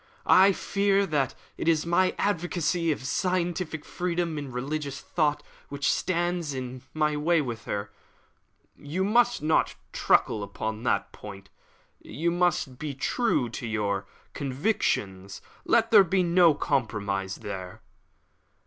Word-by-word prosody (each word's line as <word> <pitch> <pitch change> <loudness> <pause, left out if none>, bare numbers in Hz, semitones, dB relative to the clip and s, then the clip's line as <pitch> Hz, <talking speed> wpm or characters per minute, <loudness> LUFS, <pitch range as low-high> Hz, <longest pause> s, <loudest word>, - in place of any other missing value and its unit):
"I 190 +2 +7
fear 200 +1 +1
that 145 -7 0 0.2
it - - -4
is 160 -1 +3
my 180 +2 +2
advocacy 175 -3 0
of 140 - -3
scientific 175 +1 -1
freedom 170 -3 -2
in 140 -2 -7
religious 140 +3 -4
thought 150 -3 0 0.3
which 140 -1 0
stands 175 -4 -1
in 130 0 -6
my 150 -1 +1
way 165 +3 +2
with 120 -5 -4
her." 100 0 -4 0.8
"You 160 +6 -3
must 235 -1 +2
not 155 +1 +2 0.2
truckle 110 - +2
upon 110 +2 -4
that 100 -4 0
point. 100 -2 -11 0.5
You 170 +3 -2
must 175 -7 0
be 150 -2 -4
true 140 - 0
to 115 +1 -6
your 100 -3 -1 0.3
convictions; 125 - -1 0.3
let - - +3
there - - +9
be 185 +1 +1
no 170 -2 +5
compromise 100 -8 -1
there." 95 -3 -7
150 Hz, 130 wpm, -27 LUFS, 120-175 Hz, 0.8 s, there